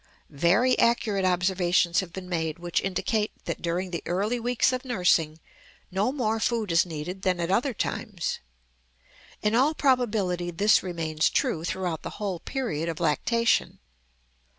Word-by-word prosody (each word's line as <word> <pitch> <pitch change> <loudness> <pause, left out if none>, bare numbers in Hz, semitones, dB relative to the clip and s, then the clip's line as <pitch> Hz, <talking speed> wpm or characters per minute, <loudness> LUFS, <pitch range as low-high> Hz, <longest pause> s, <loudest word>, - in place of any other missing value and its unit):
Very 195 - +3
accurate 215 -5 +2
observations 180 -1 +2
have 185 -3 -4
been 185 +1 -8
made 160 -2 -2
which 175 0 -1
indicate 210 +3 -1
that - - -4
during 175 +2 -2
the 170 - -3
early 205 +7 0
weeks 245 +2 +1
of 255 - -3
nursing 180 - +1 0.5
no 200 +6 +1
more 225 -5 -1
food 220 -4 0
is 170 +2 +3
needed 170 +4 -6
than 185 -2 0
at 170 +1 -1
other 245 +7 +2
times; - - -3 1.0
in 210 0 +2
all 275 +7 +3
probability 210 -11 +1
this 200 +5 +3
remains 165 -4 -1
true 160 - 0
throughout 175 -2 -2
the - - -7
whole 195 -4 -3
period 170 - -3
of 165 - -4
lactation. 230 +9 +1
185 Hz, 150 wpm, -26 LUFS, 170-225 Hz, 1.0 s, Very